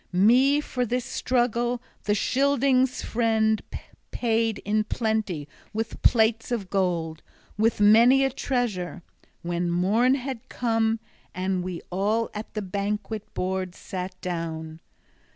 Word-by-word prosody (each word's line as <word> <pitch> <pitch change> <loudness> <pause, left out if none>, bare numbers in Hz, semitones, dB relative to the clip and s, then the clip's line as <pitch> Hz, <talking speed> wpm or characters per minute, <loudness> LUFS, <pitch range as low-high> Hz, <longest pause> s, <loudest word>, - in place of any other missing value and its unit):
Me 245 +10 +5
for 255 -4 -2
this 245 +1 -1
struggle 240 -1 0 0.3
the 205 - +2
Scyldings' 265 +1 +2
friend 220 -2 +1 0.5
paid 225 -2 0
in 215 +1 +2
plenty 215 -9 -1 0.3
with 225 +1 -4
plates 225 0 +3
of 205 -6 -3
gold, 170 -5 -1 0.3
with 220 +1 +1
many 235 +6 +6
a 270 - 0
treasure, 215 -10 -2 0.4
when 175 0 -1
morn 210 +9 +3
had 260 -3 -6
come 225 -2 0 0.4
and 185 0 -1
we 180 -2 -5
all 210 +5 0
at 210 +1 -6
the 215 - -2
banquet 205 +2 -3
board 185 0 -2
sat 185 0 -6
down. 160 -2 -4
220 Hz, 120 wpm, -25 LUFS, 185-240 Hz, 0.5 s, many